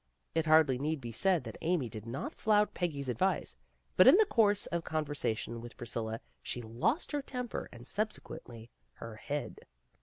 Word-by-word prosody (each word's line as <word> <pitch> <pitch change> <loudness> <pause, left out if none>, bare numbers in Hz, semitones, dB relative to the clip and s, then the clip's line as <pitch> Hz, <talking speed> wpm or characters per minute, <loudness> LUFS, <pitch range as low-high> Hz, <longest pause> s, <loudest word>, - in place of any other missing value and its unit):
It 165 -1 +1
hardly 155 -5 +5
need 155 +2 -1
be 120 -3 -6
said 175 - +2
that 115 -2 -8
Amy 165 -6 +1
did 110 0 -8
not 125 +4 -4
flout 210 -1 +2
Peggy 160 -6 -2
's - - -8
advice, 130 - 0 0.4
but - - +7
in - - +10
the 435 - +6
course 210 - +3
of 170 - -1
a - - -9
con 155 -1 -2
versation 115 -5 -2
with 120 +1 -10
Priscilla 115 -2 -4 0.2
she 120 - -3
lost 120 - 0
her 290 -1 0
temper 250 -3 -5
and 120 0 -12
subsequently 155 - -4 0.2
her 110 - -9
head. 145 -1 -4
145 Hz, 185 wpm, -32 LUFS, 115-190 Hz, 0.4 s, in